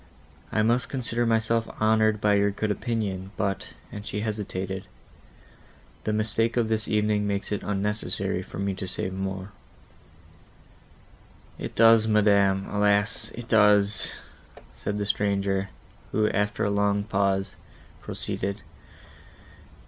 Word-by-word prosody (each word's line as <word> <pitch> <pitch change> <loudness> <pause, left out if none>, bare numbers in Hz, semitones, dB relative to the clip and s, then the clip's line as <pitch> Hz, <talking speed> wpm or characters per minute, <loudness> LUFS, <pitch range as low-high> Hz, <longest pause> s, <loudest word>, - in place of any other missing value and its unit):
I 110 - +2
must 120 +3 +2
consider 120 -3 -1
myself 115 0 +1
honoured 110 0 +3
by 105 -1 +3
your 100 0 +3
good 105 +1 -2
opinion, 100 -4 -2
but"—and 100 +1 -4
she 105 0 -4
hesitated,—"the 95 -3 -4 1.2
mistake 110 +2 0
of 115 -2 +2
this 110 -1 0
evening 105 -1 +1
makes 100 0 -2
it 105 - -1
unnecessary 105 +1 -1
for - - -10
me 100 0 -1
to 95 0 -5
say 95 +1 -1
more." 95 +1 -4 2.1
"It - - -6
does, 115 -1 +6
madam,—alas! 105 0 +2
it 120 0 -8
does!" 105 -2 +3 0.6
said 105 - -4
the 105 - -1
stranger, 100 -1 0 0.4
who, 105 0 +2
after 105 +1 0
a 100 - +1
long 100 0 +1
pause, 100 -2 0 0.5
proceeded. 100 +2 -4
105 Hz, 115 wpm, -26 LUFS, 100-110 Hz, 2.1 s, does